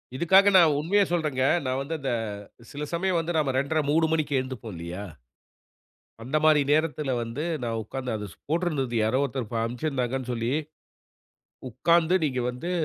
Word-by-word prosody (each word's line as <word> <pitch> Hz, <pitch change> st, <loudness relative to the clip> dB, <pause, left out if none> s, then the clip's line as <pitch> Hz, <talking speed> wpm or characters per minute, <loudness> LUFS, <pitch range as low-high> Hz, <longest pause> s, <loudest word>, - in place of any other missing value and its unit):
இதுக்காக 190 Hz, +7 st, +5 dB
நான் 160 Hz, -4 st, +6 dB
உண்மைய 185 Hz, +7 st, +2 dB
சொல்றங்க. 150 Hz, -6 st, 0 dB, 0.2 s
நான் 130 Hz, +1 st, -1 dB
வந்து 155 Hz, +4 st, -4 dB
அந்த 135 Hz, -2 st, -2 dB, 0.5 s
அ -, -, -15 dB
சில 145 Hz, +1 st, -5 dB
சமயம் 180 Hz, +1 st, +1 dB
வந்து 165 Hz, +1 st, -3 dB
நம்ம 145 Hz, -3 st, +1 dB
2-1/2, 140 Hz, +4 st, +1 dB
3 160 Hz, +2 st, +3 dB
மணிக்கு 155 Hz, -3 st, 0 dB
எந்துப்போம் 125 Hz, -5 st, -7 dB
இல்லையா? 85 Hz, +4 st, -6 dB, 1.2 s
அந்த 135 Hz, +6 st, -2 dB
மாரி 155 Hz, -1 st, +6 dB
நேரத்துல 150 Hz, -2 st, +1 dB
வந்து 115 Hz, +7 st, -4 dB, 0.2 s
நான் 115 Hz, -1 st, -2 dB
உட்கார்ந்து 125 Hz, +2 st, -4 dB
அத 105 Hz, -1 st, -5 dB
சொ -, -, -19 dB
போட்டுருந்துது 155 Hz, -7 st, -1 dB
யாரோ 110 Hz, +4 st, +1 dB
ஒருத்தர் 130 Hz, -4 st, -4 dB
ப -, -, -1 dB
அனுப்பிச்சிருந்தாங்கன்னு 125 Hz, 0 st, -2 dB
சொல்லி. 115 Hz, +1 st, -1 dB, 1.2 s
உட்கார்ந்து 170 Hz, +8 st, +2 dB
நீங்க 130 Hz, -4 st, -1 dB
வந்து 165 Hz, +9 st, -5 dB
140 Hz, 160 wpm, -26 LUFS, 125-160 Hz, 1.2 s, நான்